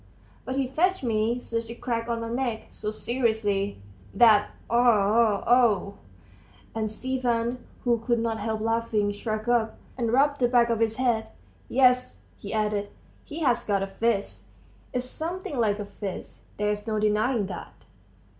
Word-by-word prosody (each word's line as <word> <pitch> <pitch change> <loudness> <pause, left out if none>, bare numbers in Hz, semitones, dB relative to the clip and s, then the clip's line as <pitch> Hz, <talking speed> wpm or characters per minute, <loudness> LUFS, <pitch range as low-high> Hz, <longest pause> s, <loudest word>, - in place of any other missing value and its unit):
but 260 - -3
he 270 -1 0
fetched 355 +6 +1
me 225 0 +1
such 230 -2 -4
a 235 - -6
crack 230 -1 -3
on 230 -1 -1
my 230 - -4
neck, 235 -1 -2
so 210 - -4
seriously, 215 - -1 0.4
that 215 -3 +6 0.2
oh! 225 -2 +3
oh!" 230 -5 +3 0.8
And 220 -1 -1
Stepan, 245 0 -1 0.2
who 240 -2 +2
could 235 +1 0
not 225 -1 -1
help 220 +1 -2
laughing, 225 -2 0
shrugged 215 +1 -4
up 235 -2 +1 0.2
and 230 -2 0
rubbed 285 +3 +3
the 245 - +4
back 240 -1 +3
of 230 - 0
his 225 -1 +1
head. 235 -3 +1 0.4
"Yes," 250 - +3 0.2
he - - -7
added; 210 -2 0 0.4
"he 315 +2 -7
has 250 -6 +2
got 200 -2 0
a - - -3
fist; 200 - 0 0.5
it's 250 0 -2
something 320 0 -4
like 210 -3 +2
a 210 - -5
fist, 200 -2 -7
there's 210 +1 -1
no 215 -1 0
denying 215 +2 +1
that!" 185 -3 -9
230 Hz, 155 wpm, -26 LUFS, 210-245 Hz, 0.8 s, that